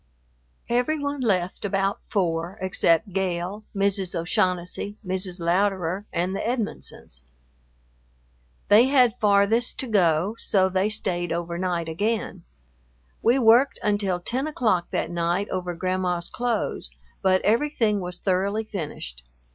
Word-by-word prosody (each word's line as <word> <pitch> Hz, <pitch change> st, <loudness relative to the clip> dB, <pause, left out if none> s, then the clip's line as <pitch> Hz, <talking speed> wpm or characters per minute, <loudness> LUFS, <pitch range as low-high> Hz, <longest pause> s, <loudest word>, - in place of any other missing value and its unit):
Every 245 Hz, +6 st, +1 dB
one 285 Hz, -1 st, -3 dB
left 185 Hz, -6 st, 0 dB
about 195 Hz, 0 st, 0 dB
four 175 Hz, -1 st, -2 dB
except 185 Hz, 0 st, +1 dB
Gale, 190 Hz, +2 st, -2 dB
Mrs. 195 Hz, -2 st, 0 dB
O'Shaughnessy, 180 Hz, +4 st, -1 dB
Mrs. 185 Hz, 0 st, -3 dB
Louderer, 185 Hz, +1 st, 0 dB
and 180 Hz, +3 st, -1 dB
the -, -, -2 dB
Edmonsons. 235 Hz, -2 st, -4 dB, 1.5 s
They 215 Hz, +4 st, +7 dB
had 250 Hz, -4 st, +3 dB
farthest 210 Hz, +3 st, +3 dB
to 260 Hz, -, -5 dB
go, 185 Hz, -1 st, +2 dB
so 190 Hz, -2 st, +2 dB
they 190 Hz, +2 st, +1 dB
stayed 180 Hz, -5 st, -2 dB
over 170 Hz, 0 st, -3 dB
night 175 Hz, -3 st, -1 dB
again. 210 Hz, +8 st, -2 dB, 0.8 s
We 235 Hz, +3 st, +4 dB
worked 245 Hz, +2 st, +5 dB
until 205 Hz, -3 st, 0 dB
ten 255 Hz, +10 st, -2 dB
o'clock 215 Hz, -, +1 dB
that 165 Hz, -, -2 dB
night 175 Hz, +3 st, 0 dB
over 180 Hz, -2 st, -3 dB
Grandma's 180 Hz, -1 st, -1 dB
clothes, 235 Hz, -, -2 dB, 0.3 s
but 185 Hz, 0 st, +3 dB
everything 225 Hz, -2 st, +2 dB
was 180 Hz, -1 st, -6 dB
thoroughly 200 Hz, +4 st, 0 dB
finished. 150 Hz, -, -6 dB
195 Hz, 125 wpm, -24 LUFS, 175-215 Hz, 1.5 s, They